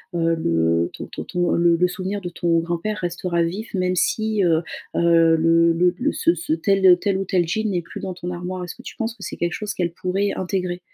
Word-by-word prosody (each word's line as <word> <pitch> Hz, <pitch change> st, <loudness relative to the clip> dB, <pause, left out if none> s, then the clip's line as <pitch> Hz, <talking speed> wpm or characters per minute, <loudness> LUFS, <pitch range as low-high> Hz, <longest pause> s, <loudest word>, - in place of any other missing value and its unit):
heu, 165 Hz, -1 st, +2 dB
le 85 Hz, -, +1 dB
ton -, -, -7 dB
ton -, -, -7 dB
ton, 175 Hz, 0 st, 0 dB
heu, -, -, 0 dB
le 170 Hz, 0 st, +4 dB
le 180 Hz, +1 st, +3 dB
souvenir 190 Hz, +3 st, -4 dB
de 180 Hz, -, -5 dB
ton 170 Hz, -1 st, 0 dB
grand-père 175 Hz, +5 st, -3 dB
restera 175 Hz, 0 st, -1 dB
vif 195 Hz, +7 st, -4 dB
même 185 Hz, -1 st, 0 dB
si 215 Hz, +3 st, +1 dB
heu, 165 Hz, -2 st, +2 dB, 0.3 s
heu, 165 Hz, -1 st, +5 dB
le 165 Hz, +1 st, +4 dB
le 175 Hz, +1 st, +2 dB
le 290 Hz, +4 st, +1 dB
ce 170 Hz, -, +2 dB
ce 165 Hz, -1 st, -2 dB
tel, 195 Hz, +4 st, +1 dB
heu, 180 Hz, -, +9 dB
tel 195 Hz, 0 st, 0 dB
ou 195 Hz, -, -2 dB
tel 175 Hz, -3 st, +1 dB
jean 220 Hz, +5 st, -1 dB
n'est 180 Hz, -2 st, 0 dB
plus -, -, -9 dB
dans 185 Hz, -, -4 dB
ton 175 Hz, 0 st, -5 dB
armoire. 180 Hz, +1 st, -5 dB
Est-ce 175 Hz, -, -6 dB
que -, -, -13 dB
tu -, -, -9 dB
penses 225 Hz, -1 st, -2 dB
que 210 Hz, -, -19 dB
c'est -, -, -6 dB
quelque 175 Hz, 0 st, -1 dB
chose 210 Hz, 0 st, -4 dB
qu'elles 175 Hz, -2 st, -1 dB
pourraient 190 Hz, +3 st, -1 dB
intégrer? 180 Hz, -1 st, -2 dB
175 Hz, 245 wpm, -22 LUFS, 170-190 Hz, 0.3 s, heu